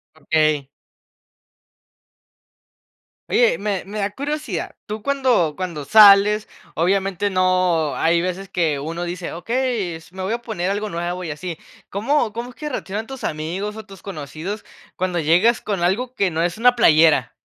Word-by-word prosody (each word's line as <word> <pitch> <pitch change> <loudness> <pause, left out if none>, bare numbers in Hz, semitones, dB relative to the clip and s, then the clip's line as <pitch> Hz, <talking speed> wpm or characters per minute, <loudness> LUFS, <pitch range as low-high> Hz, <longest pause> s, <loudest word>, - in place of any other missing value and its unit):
Okey. 155 -2 +1 2.6
Oye, 240 -2 +3
me 200 -2 -2
me 210 +2 -6
da 200 0 0
curiosidad. 295 +2 -4
Tú, 215 +1 -5
cuando 250 - +2
cuando 175 -5 -4
sales, 210 +4 +7 0.3
obviamente 195 +3 +1
no, 185 -5 +2
hay 170 +1 +2
veces 185 +2 -3
que 165 -6 0
uno 165 +4 -4
dice: 175 0 -5
"Okey, 230 -2 -1
s 165 +3 -14
me 190 - -5
voy 190 - -2
a 235 +1 -2
poner 195 -6 -2
algo 210 +1 -2
nuevo 175 +1 -3
y 160 - -4
así". 165 +2 -6 0.3
¿Cómo 230 +4 0
como 235 +3 -6
es - - -20
que 300 - -5
reaccionan 215 -5 -4
tus 265 +1 -7
amigos, 175 +7 -3
o, 220 -1 -8
tus 195 -2 -14
conocidos 180 +3 -6 0.3
cuando 180 -1 -1
llegas 175 +10 +3
con 200 -4 -3
algo 240 +8 0
que 195 -6 +1
no 160 0 -1
es 175 +2 -1
una 245 +2 +4
playera? 155 - +5
190 Hz, 160 wpm, -21 LUFS, 170-215 Hz, 2.6 s, sales